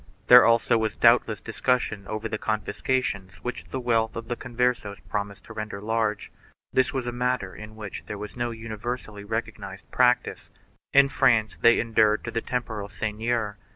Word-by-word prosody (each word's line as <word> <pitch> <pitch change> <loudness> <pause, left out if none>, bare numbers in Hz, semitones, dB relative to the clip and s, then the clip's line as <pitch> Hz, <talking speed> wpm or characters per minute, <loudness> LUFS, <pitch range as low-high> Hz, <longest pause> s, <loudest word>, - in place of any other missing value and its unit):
There 125 0 +11
also 115 0 +3
was 110 -1 -1
doubtless - - +4
discussion 110 -6 -1
over 110 +1 -3
the 110 -1 -4
confiscations 105 -2 -2
which 125 - -5
the 130 - -5
wealth 115 -2 +1
of 115 0 -6
the 120 - -1
Converses 120 -4 -1
promised 100 -1 -3
to - - -11
render 105 -2 -5
large. 110 0 -1 0.4
This 130 - +3
was 130 -3 -3
a 120 - -2
matter 125 -6 -1
in 110 0 -10
which 105 -3 -7
there 105 - -5
was 105 +1 -8
no 120 -1 -1
universally 110 -1 -6
recognized 100 -3 -5
prac 125 0 +4
tice. - - -9 0.4
In 140 0 +6
France 110 -5 +2
they 115 0 +6
enured 110 -2 +2
to - - -5
the 115 - -1
temporal 110 -5 -3
seigneur. 110 +2 -2
110 Hz, 170 wpm, -26 LUFS, 105-120 Hz, 0.4 s, There